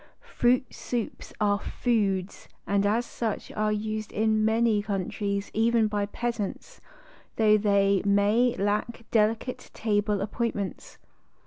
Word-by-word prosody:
Fruit 245 +1 +3
soups 240 -3 -4
are 205 -1 +2
foods 200 -6 -1 0.2
and 200 0 +2
as 230 +4 +1
such 225 -3 -4
are 215 0 0
used 215 0 -3
in 215 0 +1
many 220 -1 +3
countries 200 0 -3
by - - -4
even 230 -1 +3
the 205 -1 -1
peasants, 235 -4 -4 0.5
though 215 -1 +5
they 200 -2 +3
mav 205 +5 +3
lack 210 +4 -1
delicate 225 +3 0
table 210 -1 0
appointments. 205 -2 -3
215 Hz, 120 wpm, -27 LUFS, 200-225 Hz, 0.5 s, though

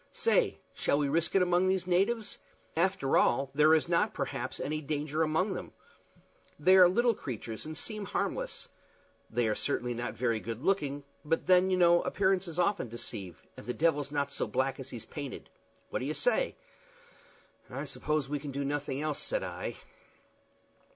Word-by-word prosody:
Say, 460 +2 +2 0.2
shall - - +1
we 145 -1 +1
risk 165 +5 0
it 190 - +6
among 180 +1 +3
these 185 -1 +1
natives? 200 +5 0 0.4
After 180 -4 +2
all, 135 +2 +2
there 155 +2 +6
is 160 - +1
not, 170 -1 +1
perhaps, - - -3
any 155 +1 -2
danger 150 +1 -2
among 160 +6 +1
them. - - -7 0.8
They 185 +6 +5
are 180 -1 +9
little 235 +5 +3
creatures 115 - -6
and 155 0 -6
seem 215 -2 -4
harmless. - - -3 0.6
They 120 0 +1
are 110 - +2
certainly 125 0 -1
not 120 +1 -4
very 115 -2 0
good 115 +3 -6
looking; 145 -7 0 0.2
but 165 +2 0
then, 185 0 +5
you 185 - +2
know, 175 -1 +5
appearances 190 -3 0
often 180 - +1
deceive, 100 -6 -6
and - - -11
the 125 - -2
devil's 145 -3 +1
not 140 -1 -1
so - - -2
black 130 +1 -1
as 135 0 -7
he's 120 -4 -7
painted. 140 -3 -7 0.4
What - - -1
do - - -3
you - - -2
say?" - - +1 1.1
"I - - -5
suppose 150 -2 -1
we 145 +1 -2
can 145 +1 -7
do 140 +1 -3
nothing 145 0 -2
else," 155 -2 -1
said - - -1
I. - - -5
155 Hz, 175 wpm, -31 LUFS, 135-185 Hz, 1.1 s, are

